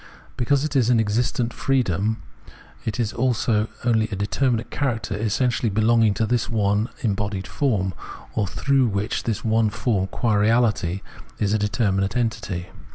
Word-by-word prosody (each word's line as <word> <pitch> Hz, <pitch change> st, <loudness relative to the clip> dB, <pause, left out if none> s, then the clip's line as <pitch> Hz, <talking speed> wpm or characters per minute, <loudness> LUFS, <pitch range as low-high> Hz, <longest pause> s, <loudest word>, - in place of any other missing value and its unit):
But -, -, -28 dB
because 140 Hz, +4 st, +2 dB
it 150 Hz, -, -4 dB
is 125 Hz, -3 st, +3 dB
an 120 Hz, -2 st, +4 dB
existent 115 Hz, +2 st, 0 dB
freedom, 110 Hz, -5 st, 0 dB, 0.6 s
it 110 Hz, 0 st, -3 dB
is 110 Hz, -3 st, 0 dB
also 115 Hz, -3 st, +1 dB, 0.2 s
only 110 Hz, -2 st, +2 dB
a 100 Hz, -, -3 dB
determinate 115 Hz, +4 st, 0 dB
character 115 Hz, -8 st, -1 dB
essentially 115 Hz, +3 st, 0 dB
belonging 110 Hz, 0 st, +3 dB
to 110 Hz, -, +1 dB
this 120 Hz, +1 st, 0 dB
one 105 Hz, 0 st, +1 dB
embodied 100 Hz, -3 st, -1 dB
form, 95 Hz, -, 0 dB, 0.4 s
or 105 Hz, -3 st, 0 dB
through 135 Hz, +5 st, +2 dB
which 100 Hz, +1 st, -2 dB
this 115 Hz, -3 st, -1 dB
form 110 Hz, -1 st, +2 dB
qua 110 Hz, 0 st, 0 dB
reahty 105 Hz, -4 st, +2 dB, 0.4 s
is 105 Hz, -1 st, 0 dB
a 110 Hz, -, +2 dB
determinate 100 Hz, -1 st, 0 dB
entity. 110 Hz, -7 st, -2 dB
110 Hz, 150 wpm, -23 LUFS, 100-120 Hz, 0.6 s, an